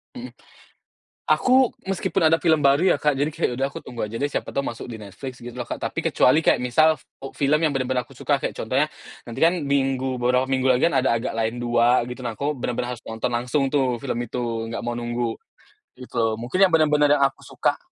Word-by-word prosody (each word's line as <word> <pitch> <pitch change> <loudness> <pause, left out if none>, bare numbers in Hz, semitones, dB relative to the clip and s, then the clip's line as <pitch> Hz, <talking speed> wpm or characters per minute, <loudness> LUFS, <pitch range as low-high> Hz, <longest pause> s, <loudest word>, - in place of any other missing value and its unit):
Mhm. 250 +1 -8 0.9
Aku 255 -1 +3
meskipun 195 0 -1
ada 165 - +4
film 160 -3 +2
baru 140 +6 +4
ya 145 - +3
Kak, 150 -3 +2
jadi 145 +2 +1
kayak - - 0
udah 135 - +1
aku 140 - -7
tunggu 115 -3 -5
aja 110 - -10
deh 145 +5 -1
siapa - - -4
tahu 140 - +1
masuk 115 - -6
di 120 - -7
Netflix 115 +5 -9
gitu 120 0 -8
loh 120 - -4
Kak, - - -6
tapi - - -4
kecuali 130 +5 +4
kayak 160 - +3
misal, 155 +6 +4 0.3
eee, 135 - -7
film 145 +2 +2
yang 155 -3 +1
bener-bener 130 -1 0
aku - - -17
suka - - 0
kayak - - -4
contohnya, - - 0 0.4
nanti 115 - -8
kan 170 +2 +5
minggu 135 -2 0
beberapa 125 +1 +2
minggu 130 -1 0
lagi 125 0 +3
kan 170 - 0
ada - - +2
Agak 115 - -4
Lain 115 +1 -1
2 120 0 +2
gitu. 130 - -14
Nah, 115 -3 -5
aku 145 +1 -1
bener-bener 125 -1 -3
harus 115 - -15
nonton 110 0 -3
langsung 125 +4 0
tuh 130 -3 0
film 115 - -3
itu, 115 -1 -4
enggak - - -4
mau 120 - -2
nunggu, 120 -1 -2 0.6
gitu 125 -1 -10
loh. 115 -1 +2
Mungkin 185 +12 +3
yang 180 - -1
benar-benar 150 -2 +4
yang 145 - +1
aku - - -23
suka - - -1
130 Hz, 225 wpm, -23 LUFS, 120-145 Hz, 0.9 s, kan